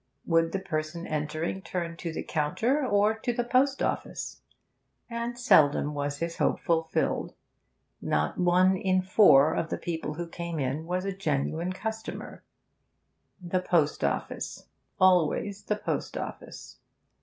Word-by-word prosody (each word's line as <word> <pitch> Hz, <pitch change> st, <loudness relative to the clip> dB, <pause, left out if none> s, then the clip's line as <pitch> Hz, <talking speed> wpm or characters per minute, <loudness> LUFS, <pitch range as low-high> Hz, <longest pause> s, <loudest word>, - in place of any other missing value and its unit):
Would 165 Hz, -1 st, +2 dB
the 195 Hz, -, -1 dB
person 160 Hz, -1 st, -4 dB
entering 155 Hz, +4 st, -2 dB
turn 170 Hz, -1 st, -4 dB
to 170 Hz, -1 st, -4 dB
the -, -, -4 dB
counter 185 Hz, -, 0 dB
or 210 Hz, -3 st, +3 dB
to 245 Hz, -, -1 dB
the 240 Hz, 0 st, -1 dB
post 265 Hz, +3 st, +2 dB
office? -, -, -3 dB, 0.7 s
And 235 Hz, +1 st, -3 dB
seldom 150 Hz, -, +4 dB
was 145 Hz, 0 st, -2 dB
his 170 Hz, +2 st, -3 dB
hope -, -, +1 dB
fulfilled; 165 Hz, -1 st, 0 dB, 0.7 s
not 75 Hz, -, 0 dB
one 180 Hz, +1 st, +4 dB
in 185 Hz, 0 st, +1 dB
four 185 Hz, -7 st, +6 dB
of 160 Hz, -, -2 dB
the -, -, -2 dB
people 160 Hz, -3 st, -4 dB
who 175 Hz, +2 st, -4 dB
came 170 Hz, 0 st, -5 dB
in 145 Hz, +3 st, -2 dB
was 180 Hz, +2 st, -1 dB
a 195 Hz, -, -1 dB
genuine 160 Hz, 0 st, -1 dB
customer; 220 Hz, +3 st, -6 dB, 1.0 s
the 180 Hz, 0 st, -1 dB
post 165 Hz, -5 st, +1 dB
office, -, -, -3 dB, 0.3 s
always 185 Hz, +2 st, +3 dB
the 210 Hz, -, 0 dB
post 210 Hz, -, -3 dB
office. -, -, -8 dB
175 Hz, 140 wpm, -28 LUFS, 155-195 Hz, 1.0 s, four